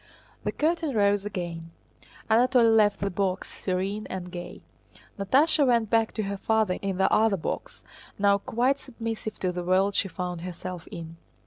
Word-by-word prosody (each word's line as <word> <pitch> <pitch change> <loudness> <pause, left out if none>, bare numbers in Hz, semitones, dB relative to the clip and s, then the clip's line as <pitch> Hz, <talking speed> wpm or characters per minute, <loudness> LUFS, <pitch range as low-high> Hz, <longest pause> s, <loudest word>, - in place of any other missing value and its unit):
The - - -1
curtain 315 -3 0
rose 205 -1 +2
again. 170 -4 -5 0.5
Anatole 240 +1 +4
left 210 -2 +4
the 200 0 -1
box, 190 0 -2
serene 195 +3 -2
and 180 -1 -5
gay. 175 -1 -7 0.6
Natásha 285 +8 +3
went 235 -3 +2
back 225 -1 +3
to 215 - -1
her 200 0 -3
father 220 -2 +1
in 195 -2 -2
the 190 - +2
other 220 -2 +4
box, 160 - -5 0.3
now 200 0 +3
quite 255 +5 +1
submissive 225 -3 -5
to 185 - +1
the 180 0 -4
world 190 +3 +2
she 195 - +1
found 180 -1 -5
herself 180 0 -7
in. 165 0 -8
200 Hz, 160 wpm, -27 LUFS, 185-225 Hz, 0.6 s, Anatole